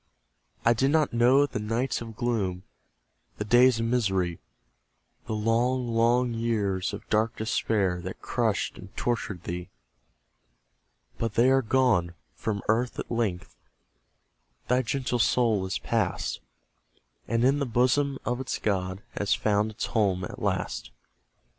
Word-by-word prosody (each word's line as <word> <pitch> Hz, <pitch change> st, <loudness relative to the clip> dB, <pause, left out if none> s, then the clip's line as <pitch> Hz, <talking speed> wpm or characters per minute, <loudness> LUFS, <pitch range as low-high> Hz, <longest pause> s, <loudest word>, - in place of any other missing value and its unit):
I 115 Hz, -, +6 dB
did 130 Hz, +4 st, +1 dB
not 155 Hz, -2 st, +2 dB
know 125 Hz, +4 st, +5 dB
the 130 Hz, -, -4 dB
nights 115 Hz, +5 st, -1 dB
of 115 Hz, -2 st, -8 dB
gloom, 105 Hz, -7 st, -1 dB, 0.7 s
The 105 Hz, -, -3 dB
days 120 Hz, +2 st, +5 dB
of 115 Hz, -, 0 dB
misery; 95 Hz, -8 st, 0 dB, 0.9 s
The 110 Hz, -, -2 dB
long, 120 Hz, +3 st, +1 dB
long 120 Hz, +2 st, +2 dB
years 105 Hz, -5 st, -1 dB
of -, -, -8 dB
dark 110 Hz, +1 st, +2 dB
despair, 105 Hz, -5 st, 0 dB
That 95 Hz, +2 st, -7 dB
crushed 115 Hz, -4 st, -1 dB
and -, -, -13 dB
tortured 105 Hz, -7 st, -2 dB
thee. 90 Hz, +1 st, -5 dB, 1.5 s
But 115 Hz, -2 st, -2 dB
they 125 Hz, +3 st, +5 dB
are 135 Hz, 0 st, +4 dB
gone; 110 Hz, -9 st, +2 dB, 0.2 s
from 105 Hz, -3 st, -3 dB
earth 120 Hz, +3 st, +1 dB
at -, -, -5 dB
length 110 Hz, -7 st, -2 dB, 1.1 s
Thy 125 Hz, +1 st, +3 dB
gentle 130 Hz, -1 st, -1 dB
soul 110 Hz, -5 st, +2 dB
is 95 Hz, -, -2 dB
pass'd, 105 Hz, -, -1 dB, 0.9 s
And 115 Hz, 0 st, +1 dB
in 140 Hz, +2 st, +3 dB
the 140 Hz, -, -1 dB
bosom 130 Hz, +4 st, +2 dB
of 125 Hz, +1 st, -1 dB
its 130 Hz, -, -3 dB
God 95 Hz, -1 st, -2 dB, 0.2 s
Has 105 Hz, 0 st, +2 dB
found 105 Hz, 0 st, +1 dB
its 110 Hz, -, -4 dB
home 95 Hz, -5 st, +1 dB
at -, -, -7 dB
last. -, -, -2 dB
115 Hz, 140 wpm, -27 LUFS, 100-125 Hz, 1.5 s, I